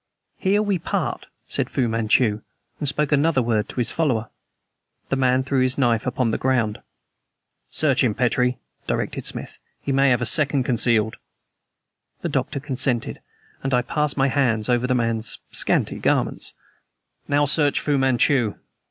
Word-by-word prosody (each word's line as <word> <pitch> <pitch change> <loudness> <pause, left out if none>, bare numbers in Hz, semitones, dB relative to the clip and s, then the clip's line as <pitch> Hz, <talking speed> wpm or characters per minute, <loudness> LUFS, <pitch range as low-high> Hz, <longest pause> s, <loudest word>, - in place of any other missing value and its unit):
"Here 205 +2 +2
we 200 -4 0
part," - - -3 0.2
said - - 0
Fu 125 - 0
Manchu, 110 -1 +1 0.4
and 145 - +2
spoke 150 +1 -1
another 145 -2 +2
word 110 -2 0
to - - -9
his 120 -2 0
follower. 125 -9 -1 0.8
The - - +1
man 130 -1 +2
threw 135 0 0
his 130 0 +2
knife 120 -3 +1
upon 125 -2 0
the - - -2
ground. 120 -5 0 0.9
"Search 140 -3 +2
him, 110 -5 +1
Petrie," 125 +1 +1 0.3
directed - - -2
Smith. - - -5 0.2
"He 140 - -4
may 135 0 +3
have 125 -2 +3
a - - -1
second 140 +2 +4
concealed." 115 -3 +1 1.1
The - - -1
Doctor - - -2
consented; 130 -3 -2 0.4
and 135 -1 0
I 125 - +2
passed 150 +3 -1
my 135 0 +2
hands 125 -6 0
over 125 0 +2
the 125 - +1
man's 115 -2 -1
scanty - - +1
garments. - - 0 0.7
"Now 145 0 +2
search 145 0 +3
Fu 145 -2 0
Manchu." 130 -3 +2
130 Hz, 155 wpm, -22 LUFS, 115-140 Hz, 1.1 s, second